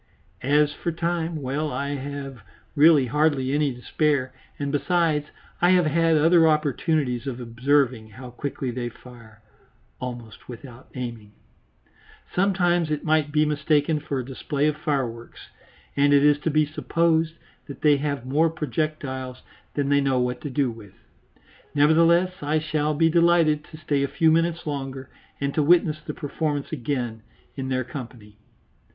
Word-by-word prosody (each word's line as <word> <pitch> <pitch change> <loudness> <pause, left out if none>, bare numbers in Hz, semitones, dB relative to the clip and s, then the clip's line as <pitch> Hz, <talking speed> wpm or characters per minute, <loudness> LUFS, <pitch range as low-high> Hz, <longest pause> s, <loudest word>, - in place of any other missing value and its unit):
As 145 +2 +2
for 170 - -3
time, 165 -2 -2
well, 145 +4 -2
I 140 +3 -3
have 140 -2 -6 0.3
really 150 -2 +6
hardly 140 -1 +1
any 145 -1 +1
to 125 - -14
spare, 140 -4 0 0.2
and, 140 -1 -3
besides, 150 +1 +1 0.3
I 175 - +5
have 180 -2 +4
had 165 +1 +3
other 165 +2 +5
opportunities 150 -3 0
of 130 -2 -4
observing 125 -1 0
how 125 +4 -10
quickly 130 0 -4
they 120 0 -4
fire 115 -3 -16 0.6
"almost 120 -3 -8
without 125 0 -11
aiming." 115 -5 -6 1.0
Sometimes 175 -3 +2
it 150 -1 -2
might 155 -1 +1
be 155 0 +3
mistaken 150 0 +1
for 145 -2 -4
a 130 - -3
display 140 +2 -2
of 150 -1 +1
fireworks, 135 -7 -4 0.5
and 145 0 +4
it 140 - +4
is 145 0 +4
to 160 - -1
be 155 0 +3
supposed 165 +1 0 0.3
that 140 - -9
they 150 -2 +5
have 140 -3 -3
more 150 +5 +2
projectiles 140 -3 -4 0.3
than 140 -1 0
they 140 0 +4
know 135 -2 +1
what 125 0 -1
to 145 - -5
do 135 -2 0
with. 110 -4 -13 0.8
Nevertheless 165 +5 +4
I 150 +2 0
shall 155 -1 -1
be 165 +2 +3
delighted 170 -3 +3
to 155 - -12
stay 145 -3 -1
a 140 - +1
few 160 +3 +2
minutes 165 +1 +1
longer 135 -3 -5 0.3
and 140 0 -2
to 155 - +1
witness 155 0 +3
the - - -7
performance 145 -1 -3
again 120 -5 -3 0.3
in 130 -1 -4
their 130 -1 0
company. 115 -6 -10
145 Hz, 155 wpm, -24 LUFS, 130-155 Hz, 1.0 s, really